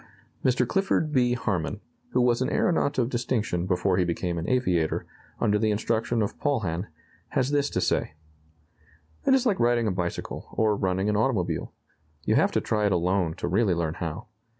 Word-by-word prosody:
Mr. 125 -1 +2
Clifford 190 -4 +1
B. 125 -3 +3
Harmon, 105 -5 -2 0.3
who 125 - +3
was 120 0 +2
an 130 - +1
aeronaut 150 -4 +1
of 120 -3 +2
distinction 115 -7 -1
before 90 0 +1
he 90 - +3
became 85 0 -2
an 85 - -3
aviator, 90 -11 +1 0.3
under 105 0 +2
the 110 0 +2
instruction 115 +2 0
of 100 - -4
Paulhan, 105 - -1 0.4
has 130 +1 0
this 145 -1 +2
to - - -1
say: 75 - 0 1.1
"It 265 - +6
is 265 -1 +1
like 210 -6 +2
riding 120 -1 +3
a 105 - +1
bicycle, 90 -1 -4
or 110 -1 +2
running 95 0 0
an 105 - +1
automobile. 105 -5 0 0.5
You - - +2
have - - +3
to - - +2
try 105 -1 +1
it - - 0
alone 90 -1 +1
to - - -4
really 95 +1 +2
learn 80 -2 -1
how. 85 +7 -5
105 Hz, 180 wpm, -26 LUFS, 90-125 Hz, 1.1 s, It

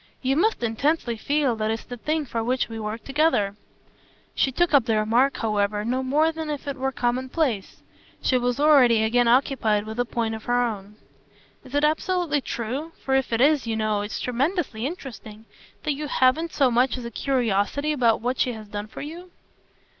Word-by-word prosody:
"You 265 +1 +2
must 405 - +1
intensely 235 +2 0
feel 280 +2 0
that 215 0 -1
it's 225 +1 -2
the 245 - -8
thing 305 +5 -2
for 230 -3 -3
which 255 +2 0
we 225 -1 -7
worked 215 +1 -5
together." 270 -9 +1 0.8
She 270 - +1
took 345 +5 +1
up 275 -5 +5
the 225 - +1
remark, 230 +6 +2
however, 210 -1 0
no 255 +3 0
more 300 +5 +2
than 320 -1 -5
if 290 -1 -5
it 280 - -2
were 265 +1 -1
commonplace; 255 - -2 0.4
she 260 - +1
was 245 +1 0
already 260 -7 +5
again 240 +2 +2
occupied 230 -4 +2
with 220 +2 -7
a - - +4
point 230 -2 -2
of 220 -1 -7
her 245 0 +2
own. 210 -4 -3 0.7
"Is 260 +1 -9
it 290 - +2
absolutely 315 0 +1
true 260 +8 -4
for 265 - 0
if 265 -2 +1
it 230 +1 +1
is, 285 -2 +3
you 225 - -1
know, 215 -1 0
it's 205 +1 -4
tremendously 255 - -1
interesting 225 - -9 0.4
that 300 - 0
you 295 +2 -5
haven't 290 +5 +2
so 270 -4 +2
much 250 +3 +2
as 245 - -7
a 235 - -6
curiosity 250 +3 0
about 235 -7 +2
what 250 +3 -2
she 250 - +1
has 215 -2 -9
done 205 0 -5
for - - -9
you?" 340 +5 -8
250 Hz, 195 wpm, -24 LUFS, 225-285 Hz, 0.8 s, up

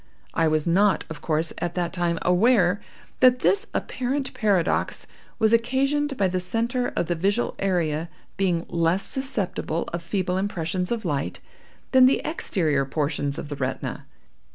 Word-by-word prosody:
I 165 - +2
was 155 -1 +1
not, 190 +4 +3
of 160 - -7
course, 160 +1 +1
at 175 0 -3
that 175 -1 -1
time 175 -2 0
aware 185 0 +3 0.4
that 255 -1 +5
this 405 +2 +2
apparent 265 +2 -2
paradox 200 -6 0 0.3
was 220 0 +3
occasioned 270 +4 +1
by 195 - +3
the 185 0 -1
center 230 +7 -1
of - - 0
the 175 - 0
visual 200 +8 0
area 170 -4 0 0.3
being 180 -3 0
less 170 +3 +1
susceptible 225 - -1
of 170 - -2
feeble 185 +1 -1
impressions 180 -1 -2
of 230 -3 -2
light 145 -4 -2 0.5
than 260 -1 +7
the 265 - +3
exterior 160 - 0
portions 145 0 -1
of 145 - -6
the 145 - -4
retina. 130 -1 -4
185 Hz, 155 wpm, -24 LUFS, 165-235 Hz, 0.5 s, than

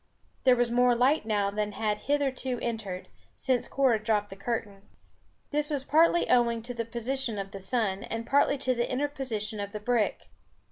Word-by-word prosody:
There 255 -1 +7
was 240 -1 +1
more 245 0 +4
light 255 +1 +2
now 205 -2 +1
than 210 0 -2
had 210 -1 -1
hitherto 270 -3 -1
entered, 215 -6 -4 0.3
since 255 -2 0
Cora 250 -6 +2
dropped 210 -2 0
the - - -7
curtain. 200 -1 -4 0.7
This 295 0 +1
was 285 -3 -1
partly 330 +4 +4
owing 235 -2 +3
to 245 +1 -5
the 230 -1 -3
position 235 0 -2
of 195 0 -5
the 195 - -7
sun, 195 0 -1
and 230 0 -4
partly 285 +3 +3
to 260 -1 0
the 240 -1 -1
interposition 255 -6 -2
of 200 0 -5
the 210 - -4
brick. 230 0 0
235 Hz, 180 wpm, -28 LUFS, 210-260 Hz, 0.7 s, There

